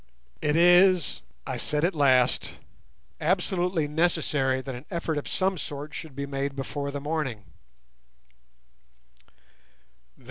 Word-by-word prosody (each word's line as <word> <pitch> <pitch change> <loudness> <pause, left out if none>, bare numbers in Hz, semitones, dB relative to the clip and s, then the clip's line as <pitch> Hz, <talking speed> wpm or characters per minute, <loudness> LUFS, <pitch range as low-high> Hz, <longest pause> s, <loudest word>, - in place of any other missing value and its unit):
"It 150 - +1
is," 175 - +5 0.2
I - - -3
said 150 +2 0
at 180 - +1
last, 130 -5 +2 0.6
"absolutely 180 -1 0
necessary 150 -4 +1
that 130 0 -6
an 125 +4 -9
effort 170 -3 -2
of - - -8
some 190 -2 0
sort 145 +1 -6
should 155 -5 -8
be 140 0 -3
made 140 0 -3
before 140 +1 -4
the 140 0 -4
morning." 145 -7 -3
150 Hz, 115 wpm, -27 LUFS, 135-170 Hz, 0.6 s, is